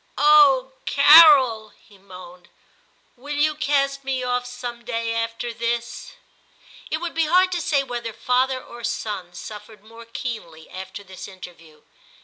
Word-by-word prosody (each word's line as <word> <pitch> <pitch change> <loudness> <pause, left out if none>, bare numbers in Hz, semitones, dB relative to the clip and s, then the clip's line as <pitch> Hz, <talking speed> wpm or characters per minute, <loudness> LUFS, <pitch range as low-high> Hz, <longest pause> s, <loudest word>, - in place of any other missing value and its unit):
* - - -39
Oh! 285 -3 +5 0.2
Carol,' 280 -8 +6
he 200 -2 -22
moaned, 180 -2 -14 0.4
* - - -39
will 290 +4 -7
you 305 +1 +1
cast 275 -2 -1
me 265 -1 -3
off 245 0 -2
some 245 -1 -8
day 230 -1 -3
after 230 +1 -4
this? 235 +1 -4 0.4
' - - -21
It 315 - -1
would 340 +1 -6
be 325 -1 0
hard 370 +3 +3
to 350 -1 -2
say 285 -4 0
whether 240 -3 -6
father 255 +3 0
or 240 -1 -13
son 205 -6 -5
suffered 210 0 -11
more 230 +1 -14
keenly 220 -9 -8
after 190 +2 -9
this 190 -1 -11
interview. 165 -5 -14
240 Hz, 155 wpm, -22 LUFS, 210-275 Hz, 0.4 s, Carol